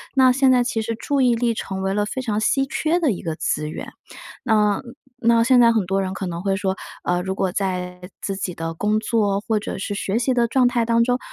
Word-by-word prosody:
那 260 -1 +5
现 265 0 +4
在， 250 -1 +3
其 230 -2 -1
实 230 +1 -3
注 280 +4 -1
意 250 -2 +4
力 235 0 +1
成 190 -3 -5
为 190 0 -1
了 205 +1 0
非 260 +5 -4
常 215 -4 -1
稀 270 +4 +2
缺 315 +5 0
的 325 -5 +2
一 180 - -7
个 165 -2 -3
资 150 0 -1
源。 - - -7 0.6
那 210 -4 +2 0.4
那 230 0 +5
现 255 +2 +4
在 235 -1 +6
很 220 -4 +1
多 195 +2 0
人 190 0 -3
可 190 - -4
能 170 -1 -4
会 195 -1 0
说， 190 -1 -1 0.3
呃， 175 0 +1
如 190 +1 -3
果 190 -1 0
在 180 -2 -3 0.2
自 195 - -3
己 190 -2 -4
的 165 0 -4
工 210 +6 0
作 210 -3 +1
或 220 +1 0
者 210 - -5
是 200 +1 -4
学 200 +2 -1
习 255 +2 +1
的 240 -1 +2
状 255 0 +3
态 240 -1 +1
当 230 0 +2
中， 245 0 +1
215 Hz, 265 characters per minute, -22 LUFS, 190-245 Hz, 0.6 s, 在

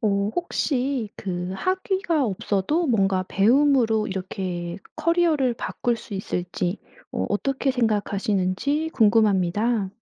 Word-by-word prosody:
어 200 -2 +1
혹시 270 - -1
그 180 -1 -4
학위가 370 - 0
없어도 210 - 0
뭔가 195 -7 +2
배움으로 230 0 +3
이렇게 185 -2 -4 0.2
커리어를 330 -6 +2
바꿀 235 0 -2
수 215 -1 -9
있을지 180 0 -3 0.3
어 - - -1
어떻게 270 +6 0
생각하시는지 215 +4 0
궁금합니다. 210 -1 +2
215 Hz, 265 characters per minute, -24 LUFS, 195-275 Hz, 0.3 s, 배움으로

